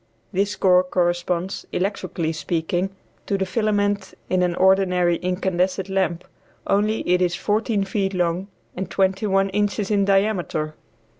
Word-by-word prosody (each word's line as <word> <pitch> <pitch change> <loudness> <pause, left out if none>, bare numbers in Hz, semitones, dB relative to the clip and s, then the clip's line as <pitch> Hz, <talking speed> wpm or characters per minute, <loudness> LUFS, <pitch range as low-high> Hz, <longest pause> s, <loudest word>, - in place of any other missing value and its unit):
This 200 +2 0
core 180 -1 +4
corresponds, 175 0 -1
electrically 180 -4 -2
speaking, 170 +3 -1 0.4
to 200 - +1
the 190 - 0
filament 205 -1 0 0.2
in 185 0 +3
an 175 -1 +1
ordinary 180 -2 +3
incandescent 185 +1 -1
lamp, 190 -3 0 0.4
only 210 +2 +1
it 180 +1 +3
is 175 -1 +2
fourteen 210 0 0
feet 195 0 -1
long 175 +1 0 0.3
and 190 +1 -4
twenty 190 +2 +1
one 195 0 +2
inches 205 +1 -1
in 200 -1 +3
diameter. 195 -6 +1
190 Hz, 135 wpm, -22 LUFS, 180-200 Hz, 0.4 s, core